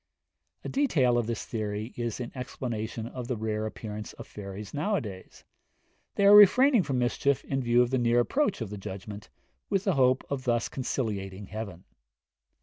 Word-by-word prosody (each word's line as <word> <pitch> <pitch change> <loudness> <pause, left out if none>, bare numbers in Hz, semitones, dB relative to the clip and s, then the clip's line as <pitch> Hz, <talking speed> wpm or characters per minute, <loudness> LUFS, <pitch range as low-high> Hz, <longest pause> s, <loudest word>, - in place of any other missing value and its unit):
A - - -5
detail 150 - +2
of 120 -2 +1
this 115 -2 -3
theory 110 0 -4
is 120 -1 -3
in 120 -1 -5
explanation 120 -3 -4
of 120 +1 -6
the 125 - -2
rare 110 0 -2
appearance 105 -1 -7
of - - -10
fairies 100 0 -8
nowadays; 145 - -3 0.7
they 200 - +2
are 205 +1 +9
refraining 240 +5 +7
from 135 -7 -2
mischief 130 +2 +1
in 135 -1 -1
view 120 0 +4
of 120 - -3
the 130 - +2
near 120 0 +3
approach 215 - +1
of 110 -3 -4
the 105 - -6
judgment, 100 +2 -8 0.4
with 195 -2 +1
the 195 - +2
hope 130 -2 +3
of 135 -2 -2
thus 120 -2 +1
conciliating 105 -7 -3
heaven. 100 -4 -6
120 Hz, 170 wpm, -28 LUFS, 105-135 Hz, 0.7 s, are